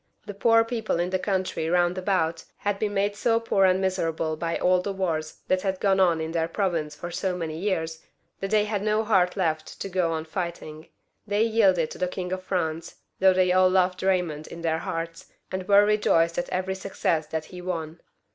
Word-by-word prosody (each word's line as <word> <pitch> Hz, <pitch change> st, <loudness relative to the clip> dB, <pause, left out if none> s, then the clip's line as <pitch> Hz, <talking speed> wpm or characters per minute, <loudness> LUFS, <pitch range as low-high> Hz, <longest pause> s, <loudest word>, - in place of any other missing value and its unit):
The 205 Hz, -, -6 dB
poor 225 Hz, +3 st, +4 dB
people 225 Hz, -6 st, -2 dB
of 175 Hz, +1 st, -1 dB
the 185 Hz, -, 0 dB
country 185 Hz, -4 st, -1 dB
roimd 175 Hz, +1 st, +2 dB
about 185 Hz, -4 st, 0 dB
had 205 Hz, -1 st, -2 dB
been 205 Hz, -1 st, -1 dB
made 205 Hz, +1 st, +1 dB
so 230 Hz, +2 st, +2 dB
poor 205 Hz, -4 st, +2 dB
and 185 Hz, 0 st, +3 dB
miserable 165 Hz, -4 st, -1 dB
by 165 Hz, +1 st, -2 dB
all 180 Hz, 0 st, +3 dB
the 200 Hz, -, -3 dB
wars 165 Hz, -5 st, -3 dB
that 185 Hz, 0 st, +2 dB
had 190 Hz, -1 st, -2 dB
gone 195 Hz, -1 st, +2 dB
on 175 Hz, -3 st, +4 dB
in 160 Hz, 0 st, -3 dB
their 165 Hz, -1 st, 0 dB
province 165 Hz, -5 st, -1 dB
for 175 Hz, +3 st, -7 dB
so 180 Hz, +1 st, -2 dB
many 160 Hz, -3 st, -4 dB
years, 160 Hz, -4 st, -2 dB, 0.4 s
that 195 Hz, -, -3 dB
they 210 Hz, 0 st, +3 dB
had 205 Hz, -2 st, -2 dB
no 215 Hz, +1 st, +1 dB
heart 190 Hz, -4 st, +2 dB
left 160 Hz, -4 st, -2 dB
to 195 Hz, -, -4 dB
go 180 Hz, -3 st, 0 dB
on 160 Hz, 0 st, -3 dB
fighting. 160 Hz, -2 st, -5 dB, 0.4 s
They 205 Hz, +1 st, +2 dB
yielded 195 Hz, -8 st, +3 dB
to -, -, -9 dB
the 180 Hz, -, +1 dB
King 180 Hz, 0 st, -5 dB
of 185 Hz, -, -3 dB
France, 165 Hz, -4 st, -3 dB, 0.2 s
though 190 Hz, 0 st, +6 dB
they 185 Hz, -1 st, +3 dB
all 185 Hz, 0 st, +5 dB
loved 185 Hz, -1 st, +2 dB
Baymond 180 Hz, -5 st, 0 dB
in 170 Hz, -, -9 dB
their 160 Hz, -1 st, +1 dB
hearts, 165 Hz, 0 st, -5 dB, 0.2 s
and 185 Hz, 0 st, -4 dB
were 205 Hz, 0 st, +6 dB
rejoiced 170 Hz, -6 st, +2 dB
at 175 Hz, -, -3 dB
every 185 Hz, +1 st, -1 dB
success 180 Hz, -4 st, -1 dB
that 155 Hz, 0 st, -3 dB
he 180 Hz, -, -7 dB
won. 165 Hz, -2 st, -4 dB
185 Hz, 210 wpm, -26 LUFS, 165-195 Hz, 0.4 s, though